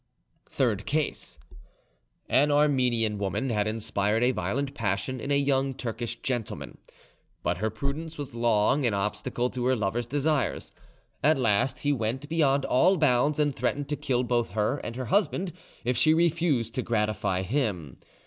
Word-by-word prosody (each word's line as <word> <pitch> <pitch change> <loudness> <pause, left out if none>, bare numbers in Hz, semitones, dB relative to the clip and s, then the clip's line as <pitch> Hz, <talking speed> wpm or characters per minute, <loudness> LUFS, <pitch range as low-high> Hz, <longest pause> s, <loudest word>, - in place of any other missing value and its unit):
THIRD 110 -6 0
CASE 155 +1 -2 0.9
An 145 +3 +3
Armenian 125 -7 +2
woman 100 +7 -1
had 105 -1 +1
inspired 110 0 0
a 125 - +4
violent 125 +7 -2
passion 110 +5 -2
in 140 - -5
a 140 - +3
young 135 -1 +1
Turkish 120 0 -4
gentleman, 120 -5 -4 0.6
but - - 0
her 110 +4 0
prudence 140 +8 -4
was 145 -4 -6
long 115 +3 +2
an 115 -5 +1
obstacle 105 +4 -1
to 125 -1 -3
her 130 +1 +3
lover's 110 +2 -1
desires. 145 +1 -1 0.5
At 155 +2 +4
last 125 +3 +1
he 145 0 +2
went 125 +3 -2
beyond 140 -4 +2
all 185 +9 +4
bounds, 145 -1 +3
and 145 -3 +1
threatened 140 +4 -1
to 150 - 0
kill 130 -4 0
both 120 -3 0
her 110 +6 +1
and 115 - -6
her 130 0 -4
husband 185 - +1 0.3
if 125 +1 +1
she 155 +4 +4
refused 160 -8 +1
to 130 - -1
gratify 105 -5 0
him. 95 - -2
125 Hz, 160 wpm, -27 LUFS, 110-145 Hz, 0.9 s, a